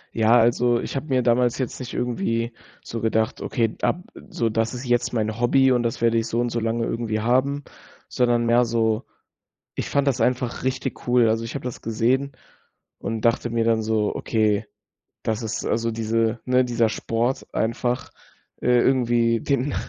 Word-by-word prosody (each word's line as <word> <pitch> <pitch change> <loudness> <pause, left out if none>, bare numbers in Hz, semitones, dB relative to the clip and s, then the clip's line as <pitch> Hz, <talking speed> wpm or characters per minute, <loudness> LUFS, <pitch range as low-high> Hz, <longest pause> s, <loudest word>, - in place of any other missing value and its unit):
Ja, 115 +2 +5
also 120 +1 +3
ich - - -5
habe 135 +3 -3
mir 130 -3 +1
damals 120 0 +2
jetzt 130 -3 -3
nicht 130 -1 -7
irgendwie 115 -1 -1 0.3
so 115 - -5
gedacht: 110 +1 0
„Okay, 115 -4 -1
ab 180 - 0 0.3
so 115 - -1
das 115 +2 -1
ist 125 +2 -6
jetzt 120 -1 +1
mein 110 -1 -2
Hobby 130 +2 +4
und 125 -1 +3
das 115 -1 -2
werde 115 0 +3
ich 115 - -3
so 115 - -1
und 120 0 +1
so 115 - -1
lange 115 +1 -1
irgendwie 115 -2 -2
haben“, 130 +5 +1 0.5
sondern 120 -1 +2
mehr 120 +1 +4
so, 115 -1 0 0.7
ich - - -3
fand 140 0 +1
das 135 - +1
einfach 125 -1 0
richtig 130 -1 -3
cool. 120 -2 +4
Also, 115 +1 0
ich 115 - -6
habe 140 - -5
das 125 - -5
gesehen 125 +5 0 0.7
und 115 -1 -4
dachte 115 +1 +2
mir 115 0 0
dann 115 -1 +2
so: 110 -1 0
„Okay, 110 -2 +1 0.6
das 110 +1 -2
ist 110 0 -3
also 115 0 0
diese 115 +1 0
ne, 125 0 +4
dieser 120 -2 +1
Sport 120 +4 -1
einfach, 120 +3 -1 0.5
äh, - - -4
irgendwie 120 -3 +2
den 140 0 0
115 Hz, 180 wpm, -23 LUFS, 115-125 Hz, 0.7 s, Ja